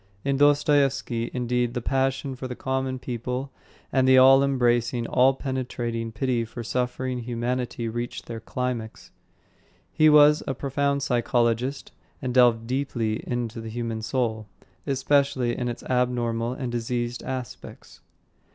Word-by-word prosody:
In 140 0 +1
Dostoyevsky, 140 -4 +2
indeed, 125 -1 -1
the - - 0
passion 135 +2 -1
for 130 +1 -6
the 125 - -6
common 130 0 -2
people 125 +2 -4 0.4
and 130 -1 +2
the 130 0 +6
all 135 +1 +7
embracing, 120 -3 +1
all 130 +3 +3
penetrating 120 -4 -3
pity 120 +1 0
for 115 +1 -7
suffering 125 +1 -2
humanity 120 0 -3
reach 120 +2 -4
their 115 -1 -7
climax. 115 -1 -5 0.8
He 155 0 +5
was 150 0 +6
a 135 - -2
profound 140 +1 -1
psychologist 120 0 0 0.3
and 130 -3 -3
delved 120 -3 +4
deeply 120 -4 -2
into 120 -2 -3
the 115 - -7
human 115 -1 -4
soul, 110 -2 -2 0.4
especially 135 -2 +1
in 125 - -3
its 120 - -6
abnormal 120 -2 0
and 130 -2 -4
diseased 120 0 -2
aspects. 130 -2 -8
125 Hz, 135 wpm, -25 LUFS, 120-135 Hz, 0.8 s, all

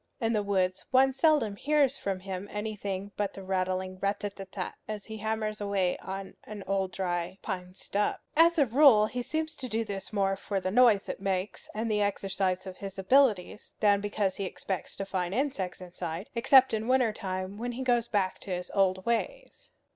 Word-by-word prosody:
In 230 -2 +1
the 210 - +2
woods 190 -2 0
one 265 +1 +5
seldom 270 -7 +3
hears 280 +2 +2
from 195 -7 -3
him 190 +1 -5
anything 205 -2 -4
but 205 -1 -1
the 195 - -8
rattling 185 0 -2
rat 200 +1 -1
a 205 - -2
tat 195 -1 -10
tat, 185 -3 -4
as 215 -2 -5
he 220 0 -7
hammers 215 0 -2
away 195 -3 +1
on 195 0 -6
a 215 - -8 0.3
dry 175 -2 -2
old 190 - -17
pine 180 -2 -5
stub. 205 +1 -1 0.2
As 335 +2 +6
a 290 - +5
rule 250 -3 +6
he 245 +3 -3
seems 315 +5 -2
to 255 -3 -5
do 225 0 -1
this 195 -2 -6
more 195 -2 +1
for 195 0 -3
the 185 0 -2
noise 230 -3 +5
it - - -5
makes, 195 0 -2
and 220 +1 -1
the 210 0 +2
exercise 195 -2 0
of 185 -1 -8
his 195 0 -7
abilities, 210 -1 +2
than 205 -2 +4
because 205 -2 -1
he 195 - -2
expects 190 0 -4
to 195 - -4
find 185 -1 -2
insects 245 -9 -1
inside; 175 0 -6
except 265 +2 +6
in 220 +1 -1
winter 255 -4 +3
time, 190 0 -4
when 245 +1 -3
he 260 +2 -4
goes 240 -2 +2
back 195 -5 0
to - - -11
his 180 -1 -3
old 190 -1 +2
ways. - - -3
205 Hz, 200 wpm, -29 LUFS, 190-230 Hz, 0.3 s, As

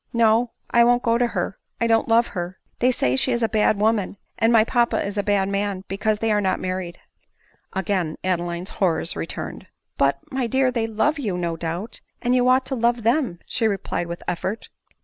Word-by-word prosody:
No, 230 +1 +3 0.2
I 235 - +6
won't 245 +1 +3
go 230 0 +2
to 245 - +3
her; 190 -4 -3 0.2
I 230 - +1
don't 225 -1 +2
love 230 +1 +4
her; 180 0 -5 0.2
they 250 - +4
say 130 - +1
she 255 - +1
is 235 -1 0
a - - +4
bad 215 -1 +2
woman, 210 -2 +1 0.2
and 225 - +4
my 225 -2 +6
papa 235 +1 +1
a 205 0 -1
bad 200 -2 +1
man, 200 -1 -2
because 215 +2 0
they 225 +1 0
are 210 0 +2
not 190 -2 0
married." 185 -2 -4 0.7
Again 185 -4 -1
Adeline's 175 0 -2
horrors 170 -3 0
returned. 80 0 -6 0.2
" - - -54
But, 140 0 +3
my 260 -2 -1
dear, 265 +2 +2
they 230 -2 -1
love 285 +8 0
you 205 -9 -2
no 170 -2 -2
doubt; 170 +7 -5 0.2
and 245 0 0
you 250 0 +3
ought 260 +1 +4
to 265 - -2
love 235 -1 +1
them," 235 - +1
she 225 - 0
replied 195 -4 -2
with 170 0 -6
effort. 190 +5 -3
215 Hz, 205 wpm, -23 LUFS, 185-235 Hz, 0.7 s, I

